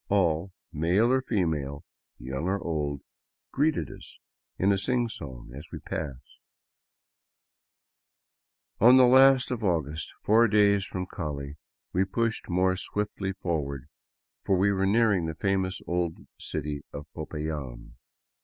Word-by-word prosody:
All, 90 -2 +1 0.2
male 90 +10 +2
or 130 - +3
female, 80 - -2 0.3
young 65 +6 -4
or 95 +2 0
old, 75 -5 -2 0.5
greeted 150 +2 0
us - - -13 0.4
in 95 +2 +3
a 100 - +2
sing 120 +3 +1
song 65 - -9
as 75 +4 -9
we - - -5
passed. 70 -5 -7 2.4
On 125 +4 +8
the 130 - +8
last 130 +1 +6
of 120 -3 -3
August, 80 -5 -1
four 115 +3 +5
days 100 -2 +3
from 90 -1 -4
Cali, 75 -4 -5 0.4
we 95 - +3
pushed 115 +4 -2
more 95 +1 +2
swiftly 100 0 -3
forward, 70 -7 -3 0.6
for 95 - +2
we 100 +2 +3
were 95 0 +1
nearing 100 -5 +3
the 80 - -4
famous 95 0 -1
old 85 -2 -1 0.2
city 75 0 -4
of 70 - -7
Popayan. 75 -6 -6
90 Hz, 130 wpm, -27 LUFS, 75-105 Hz, 2.4 s, On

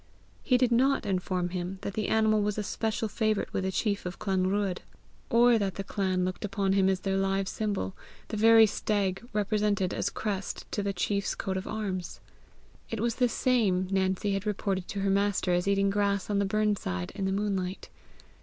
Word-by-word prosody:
He 255 - +3
did 250 -1 +2
not 265 +2 +3
inform 180 -2 -1
him 180 +1 -4
that 200 - -3
the 215 0 -2
animal 220 -1 +3
was 210 0 -1
a 210 - -1
special 220 +1 -2
favourite 215 0 -1
with 190 - -1
the 190 - -1
chief 205 +1 -1
of 180 0 -5
Clanruadh, 190 0 0 0.5
or 235 0 +5
that 195 -3 -1
the 195 - -4
clan 190 -2 -1
looked 185 0 -4
upon 195 -1 0
him 195 -1 +3
as 190 -1 0
their 195 -1 0
live 195 0 0
symbol, 200 - -2 0.3
the - - -3
very 225 +1 +7
stag 200 -2 -1
represented 205 -2 0
as - - -1
crest 200 -3 -4
to 205 - -1
the 200 0 -1
chief's 200 +2 -1
coat 190 - -3
of 190 - -4
arms. 190 -5 -4 0.7
It 225 - -3
was 230 +1 -1
the 250 -2 +3
same 205 -8 +1
Nancy 190 +1 +1
had 195 +1 -2
reported 195 -3 -1
to 200 - -4
her 195 - +1
master 200 -2 +1
as 180 +2 +1
eating 200 0 +2
grass 200 -1 0
on 200 - +2
the 200 - +2
burn 210 +1 +1
side 90 - -4
in 195 - -3
the 190 - 0
moonlight. 195 -2 -2
200 Hz, 195 wpm, -28 LUFS, 190-215 Hz, 0.7 s, very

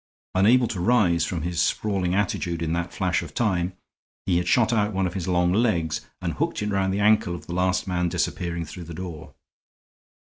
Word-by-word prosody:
Unable 115 +6 +4
to 105 -6 -4
rise 90 -5 +3
from 85 -4 -3
his 85 -1 -1
sprawling 95 -2 0
attitude 90 -4 -1
in 80 0 -1
that 85 +1 -2
flash - - 0
of - - -9
time, 95 -5 0 0.5
he 90 -3 +2
had 90 0 -1
shot 120 +4 +3
out 105 -1 +1
one 95 0 0
of 90 - -2
his 95 -2 -4
long 90 -1 +2
legs 85 -9 +1 0.2
and - - -1
hooked - - -2
it 105 - -1
round 95 -1 +1
the 100 - -1
ankle 105 -4 +3
of 80 - -10
the 85 - -6
last 90 +1 +1
man 90 -1 0
disappearing 85 -1 -2
through 85 +3 -9
the 85 0 -8
door. 85 -4 -8
90 Hz, 200 wpm, -25 LUFS, 85-100 Hz, 0.5 s, Unable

